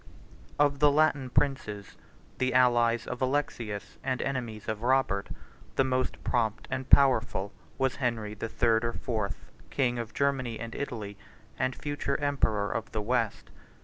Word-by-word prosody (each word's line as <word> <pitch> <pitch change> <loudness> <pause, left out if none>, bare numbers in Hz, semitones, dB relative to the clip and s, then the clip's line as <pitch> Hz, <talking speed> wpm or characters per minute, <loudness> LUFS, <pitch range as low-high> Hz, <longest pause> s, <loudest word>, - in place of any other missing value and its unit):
Of 145 -1 +3
the 150 - +6
Latin 145 -3 +2
princes, 120 -8 -1 0.4
the 130 -1 +1
allies 120 -2 +4
of 125 - -5
Alexius 115 -7 -2
and 130 -1 -1
enemies 120 -6 -3
of 110 -1 -2
Robert, 120 -6 +1 0.5
the - - +4
most 130 0 -1
prompt 110 -2 0
and 130 0 -3
powerful 120 -7 +4 0.2
was 135 -1 0
Henry 115 -5 -1
the 110 +2 -5
Third 115 -1 +2
or 115 0 -1
Fourth, 110 -5 -4 0.2
king 120 -3 0
of 115 -1 -6
Germany 130 -5 0
and 115 0 -6
Italy, 105 -7 -5 0.4
and 130 0 0
future 145 -1 -2
emperor 110 -8 +1
of 115 +1 -3
the 110 - -1
West. 115 -2 -1
125 Hz, 150 wpm, -29 LUFS, 110-135 Hz, 0.5 s, the